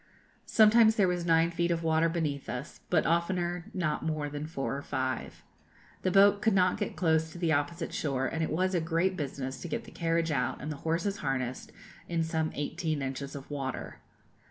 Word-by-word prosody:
Sometimes 220 0 +6
there 200 -4 +4
was 175 -1 -1
nine 165 0 +4
feet 170 0 0
of 170 -1 0
water 160 +1 +3
beneath 155 -5 -2
us, 125 +5 -6
but 165 -3 +3
oftener 175 +1 0
not 170 -5 -1
more 155 -2 -2
than 145 +1 -5
four 135 -3 -3
or 140 - -4
five. 130 -2 -3 0.6
The 185 - +1
boat 200 +2 +5
could 220 -4 +3
not 185 +1 +3
get 205 - -3
close 160 -2 +1
to - - -10
the 170 -2 +1
opposite 145 +3 -1
shore, 135 -3 -1
and 160 +5 -2
it 160 - 0
was 185 +5 0
a 175 - +2
great 165 +3 +1
business 135 -4 -4
to - - -5
get - - -3
the - - -13
carriage 165 -1 0
out 125 -4 0
and 150 +3 -5
the 150 - -5
horses 170 +7 -1
harnessed, 130 -4 -3 0.4
in 170 -1 +1
some 160 -1 -1
eighteen 155 0 -2
inches 135 +1 -4
of 140 +1 -9
water. 135 -2 -4
165 Hz, 200 wpm, -30 LUFS, 145-175 Hz, 0.6 s, Sometimes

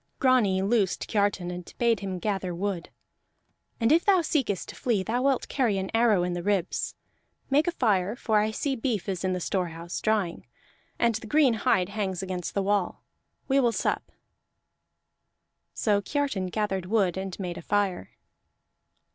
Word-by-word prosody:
Grani 225 -8 +3
loosed 200 -2 +1
Kiartan 200 -4 0
and 180 -1 -7
bade 235 -2 +2
him 190 -2 -4
gather 190 -2 -2
wood. 185 -1 -3 0.9
"And 230 +2 +3
if 335 +3 +5
thou 385 -3 +4
seekest 270 - -1
to - - -8
flee 220 -6 0
thou 235 +5 -1
wilt 270 -1 +1
carry 240 -8 +1
an 190 0 -3
arrow 225 -5 +4
in 180 0 -1
the 175 - -3
ribs. 195 -1 -1 0.6
Make 295 +5 +4
a - - +3
fire, 210 - +1
for 220 -3 +1
I 210 +1 +1
see 270 +5 -1
beef 225 -6 -2
is 190 -2 -3
in 185 -1 +1
the 180 - -2
storehouse, 170 -2 -3
drying, 210 -6 0 0.5
and 235 -1 +3
the 220 +1 -5
green 285 0 +4
hide 200 -5 +1
hangs 195 -3 -2
against 185 -2 -4
the 200 - +1
wall. 200 -2 0 0.4
We 275 0 +3
will 240 -3 +3
sup." - - -2 1.6
So 205 -2 +2
Kiartan 275 -7 -1
gathered 190 -2 -2
wood 195 -4 +2
and 190 0 -5
made 180 -3 -4
a - - -8
fire. 195 - 0
205 Hz, 165 wpm, -27 LUFS, 185-235 Hz, 1.6 s, if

